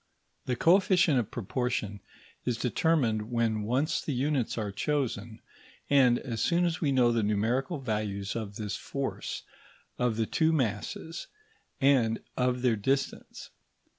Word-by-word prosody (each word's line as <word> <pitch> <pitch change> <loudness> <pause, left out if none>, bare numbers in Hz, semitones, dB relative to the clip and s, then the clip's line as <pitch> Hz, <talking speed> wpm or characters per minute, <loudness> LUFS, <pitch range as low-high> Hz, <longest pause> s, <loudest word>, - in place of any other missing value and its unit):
The 125 - +1
coefficient 180 -2 +4
of 110 - -2
proportion 120 -2 -2 0.4
is 125 -2 -1
determined 120 -5 +1
when 115 -2 +1
once 130 +8 0
the 145 - -3
units 135 -2 0
are 105 -3 -2
chosen, 115 -2 -2 0.5
and 130 -4 +5
as 115 -5 -4
soon 175 +5 +2
as 170 0 -1
we 145 -4 +2
know 125 -3 +4
the 115 -1 +1
numerical 115 - 0
values 105 -6 -3
of 105 -3 -4
this 105 -2 -3
force, 140 +5 -4 0.6
of 125 -2 +1
the 115 - +1
two 160 +7 +2
masses, 135 +6 -2 0.5
and 125 -5 +3 0.2
of 125 0 0
their 120 -3 +3
distance. 135 +7 -2
125 Hz, 135 wpm, -29 LUFS, 110-140 Hz, 0.6 s, and